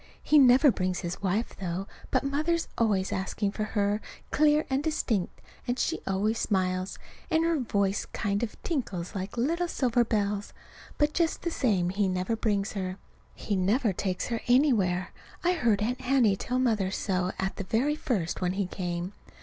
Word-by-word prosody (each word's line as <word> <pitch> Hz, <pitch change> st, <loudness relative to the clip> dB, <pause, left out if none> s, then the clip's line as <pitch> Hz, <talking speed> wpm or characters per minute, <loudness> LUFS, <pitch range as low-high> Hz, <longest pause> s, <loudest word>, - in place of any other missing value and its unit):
He 300 Hz, -, +5 dB
never 265 Hz, +1 st, +7 dB
brings 185 Hz, -3 st, -1 dB
his 175 Hz, 0 st, -4 dB
wife, 200 Hz, +4 st, -1 dB
though; 185 Hz, 0 st, -3 dB, 0.2 s
but -, -, +1 dB
Mother's 310 Hz, +5 st, 0 dB
always 200 Hz, -5 st, +1 dB
asking 200 Hz, +2 st, -1 dB
for 215 Hz, +1 st, -2 dB
her, 205 Hz, 0 st, 0 dB, 0.3 s
clear 300 Hz, +1 st, +4 dB
and 265 Hz, +1 st, 0 dB
distinct, 235 Hz, -, -1 dB, 0.3 s
and 245 Hz, +1 st, 0 dB
she 330 Hz, -, 0 dB
always 210 Hz, +4 st, 0 dB
smiles, 185 Hz, -1 st, 0 dB, 0.3 s
and 320 Hz, -1 st, +3 dB
her 335 Hz, -2 st, +2 dB
voice 200 Hz, -5 st, 0 dB
kind 200 Hz, -2 st, -1 dB
of 235 Hz, -3 st, -4 dB
tinkles 200 Hz, -, -3 dB
like 195 Hz, +2 st, -5 dB
little 335 Hz, +9 st, +1 dB
silver 245 Hz, -6 st, +2 dB
bells. 205 Hz, -2 st, -1 dB, 0.4 s
But 295 Hz, +1 st, +2 dB
just 335 Hz, -1 st, 0 dB
the 340 Hz, -, -1 dB
same 200 Hz, -, +1 dB
he 200 Hz, +1 st, +1 dB
never 185 Hz, +4 st, -1 dB
brings 210 Hz, -2 st, 0 dB
her. 185 Hz, -2 st, -3 dB, 0.4 s
He 205 Hz, -, -2 dB
never 205 Hz, +4 st, +2 dB
takes 185 Hz, 0 st, -2 dB
her 230 Hz, -1 st, -2 dB
anywhere. 225 Hz, -9 st, +3 dB, 0.3 s
I 355 Hz, +1 st, +3 dB
heard 230 Hz, -, +2 dB
Aunt 250 Hz, +4 st, -2 dB
Hattie 250 Hz, -6 st, +3 dB
tell 250 Hz, +6 st, -2 dB
Mother 220 Hz, -7 st, +2 dB
so 185 Hz, -1 st, -1 dB
at 190 Hz, 0 st, -2 dB
the -, -, -3 dB
very 250 Hz, +9 st, +1 dB
first, 215 Hz, -, -2 dB
when 180 Hz, 0 st, +1 dB
he 195 Hz, 0 st, 0 dB
came. 180 Hz, 0 st, -4 dB
210 Hz, 175 wpm, -28 LUFS, 190-260 Hz, 0.4 s, never